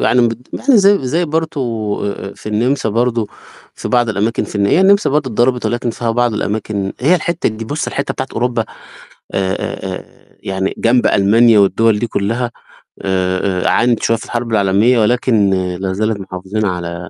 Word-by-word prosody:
يعني 125 - +3
بد 115 +2 -7
يعني 265 -2 +2
زي 200 0 +5
زي 165 +7 +1
برضه 160 -1 -2 0.4
آآ، 100 -1 -4
آآ، - - -14
في - - -9
النِمسا 115 +4 0
برضه 115 0 0 0.5
في - - -6
بعض 120 -1 +2
الأماكن 110 +2 0
في - - -10
الن 100 0 +2
هي 165 - +3
النِمسا 200 -1 +4
برضه 140 -2 0
اتضربت 120 +2 +1
ولكن 120 0 -1
فيها 115 +1 -2
بعض 120 0 +1
الأماكن 100 -2 -2
هي 150 +8 +4
الحتّة 170 0 0
ج 110 +1 -6
بُصّ 145 +7 -3
الحتّة 140 - -2
بتاعة 130 - -4
أوروبا 120 -1 -1 0.7
آآ، 95 -1 0
آآ، - - -4
آآ، - - -13 0.3
يعني 95 0 -2
جنب 120 +1 +3
ألمانيا 110 +3 +4
والدوَل 105 +2 +3
دي 120 - -1
كلّها 115 +4 -2 0.5
آآ، 95 0 0
آآ، - - +3
عانت 120 -1 +2
شوية 115 - +2
في - - -9
الحرب 120 -1 -3
العالمية 105 +4 +3
ولكن 110 -2 +2 0.3
لا 95 -1 -1
زالت 110 +1 -1
محافظين 95 +3 -4
على 90 -2 -4
115 Hz, 185 wpm, -16 LUFS, 100-125 Hz, 0.7 s, زي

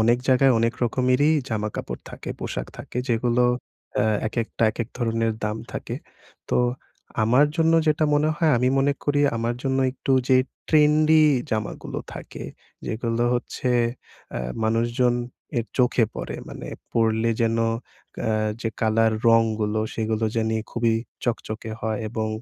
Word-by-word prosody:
অনেক 120 +2 +4
জায়গায় 130 0 +5
অনেক 115 +1 +2
রকমেরই 130 +5 +3 0.2
জামাকাপড় 105 -2 -3
থাকে, - - -8
পোশাক - - -3
থাকে, 125 - -6
যেগুলো 120 +1 +2 0.5
অ্যা 105 +1 +3 0.2
একেকটা 115 +1 -2
একেক 115 0 -4
ধরনের 115 -1 +1
দাম 105 +1 -1 0.2
থাকে। - - -4 0.5
তো - - +1 0.7
আমার 125 +7 +5
জন্য 165 0 +3
যেটা 155 0 +3
মনে 150 +1 +3
হয় 160 0 +2
আমি 125 +2 +2
মনে 140 +1 +3
করি 145 0 +2 0.2
আমার 115 +1 -1
জন্য 135 -1 0
একটু 135 - -2 0.2
যে 130 - +6 0.3
ট্রেন্ডি 155 +1 +5 0.3
জামাগুলো 110 -1 -3 0.2
থাকে, - - -8 0.4
যেগুলো 115 +1 -1
হচ্ছে 125 +1 -3 0.6
অ্যা - - -3 0.2
মানুষজন 120 +2 +2 0.4
এর 115 - -2
চোখে 125 -2 +4
পড়ে। - - -5
মানে - - -8 0.3
পড়লে 115 0 +2
যেন 115 0 +2 0.7
এ্যা 110 - +1 0.3
যে 115 - -1
কালার, 110 0 +3 0.2
রংগুলো, 110 -2 +3
সেগুলো 110 0 -1
জানি 110 0 +1
খুবই 115 -1 +1 0.3
চকচকে 110 -2 -3
হয় 110 -2 -1
এবং 110 -1 -2
115 Hz, 135 wpm, -24 LUFS, 110-130 Hz, 0.7 s, যে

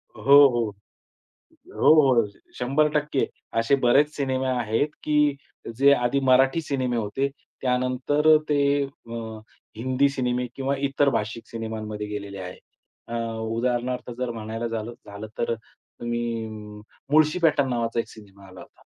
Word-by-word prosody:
हो, 110 - -11 0.3
हो. 120 -4 -1 1.0
हो, - - +5 0.3
हो. 105 - -4 0.3
100% 150 +2 +1 0.3
असे 115 +5 +3
बरेच 135 +5 +5
सिनेमे 130 -2 -1
आहेत 125 +2 0
की 150 -1 +2 0.4
जे 140 +2 +6
आधी 125 +1 +1
मराठी 135 +5 +4
सिनेमे 130 -5 -1
होते. 115 +6 -1 0.3
त्यानंतर 130 +4 +3
ते 145 - +2 0.3
अ, 115 -5 -8 0.4
हिंदी 130 +4 +2
सिनेमे 125 -2 -1
किंवा 135 +1 -1
इतर 140 +1 +2
भाषिक 115 -1 -3
सिनेमांमध्ये 110 -2 -5
गेलेले 100 -1 -6
आहेत. 90 -1 -8 0.5
अ, 115 - -7 0.3
उदाहरणार्थ 120 +2 -2
जर 125 -1 -2
म्हणायला 115 +1 -4
झालं 115 0 -4
झालं 100 +2 -8
तर 115 - 0
तुम्ही 120 0 -5 0.6
मुळशी 155 +3 +4
पॅटर्न 145 -4 +3
नावाचा 115 -1 -1
एक - - -2
सिनेमा 100 -2 -15
आला 95 -1 -12
होता. - - -17
125 Hz, 130 wpm, -25 LUFS, 115-135 Hz, 1.0 s, जे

